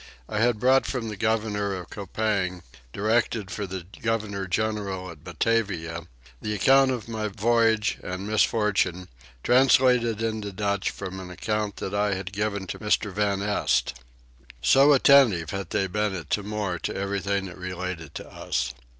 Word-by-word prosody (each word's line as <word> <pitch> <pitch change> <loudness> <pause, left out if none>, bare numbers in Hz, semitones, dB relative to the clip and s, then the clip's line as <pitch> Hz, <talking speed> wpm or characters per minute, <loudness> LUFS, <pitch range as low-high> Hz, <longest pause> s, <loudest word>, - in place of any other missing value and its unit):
I 105 - -2
had 115 -1 +2
brought 130 +2 +4
from 120 -4 -3
the 105 - -5
governor 105 -2 0
of 90 -4 -8
Coupang, 100 -3 -2 0.3
directed 110 - 0
for 100 -2 -4
the 95 -2 -6 0.2
governor 105 -3 -2
general 100 -2 -2
at 75 -4 -14
Batavia, 85 -8 -1 0.3
the 105 0 -2
account 135 +6 +5
of 120 -4 -3
my 110 -2 -3
voyage 110 +1 +2
and 90 +2 -5
misfortune, 105 -4 +1 0.3
translated 125 -3 +4
into 110 -2 -2
Dutch 100 +1 -1
from 95 -1 -6
an 90 -1 -8
account 105 +2 -2
that 95 - -5
I 105 -1 +1
had 95 +1 -6
given 100 -1 -2
to - - -6
Mr. 105 -1 0
van 100 -1 0
Este. 105 0 +1 0.7
So 140 +2 +5
attentive 125 - +5
had 95 -3 -4
they 95 - 0
been 105 +1 -1
at 80 -5 -8
Timor 105 -3 -2
to - - -4
everything 100 0 -1
that 90 -1 -9
related 90 -4 -5
to - - -7
us. 65 -1 -3
105 Hz, 155 wpm, -26 LUFS, 95-110 Hz, 0.7 s, account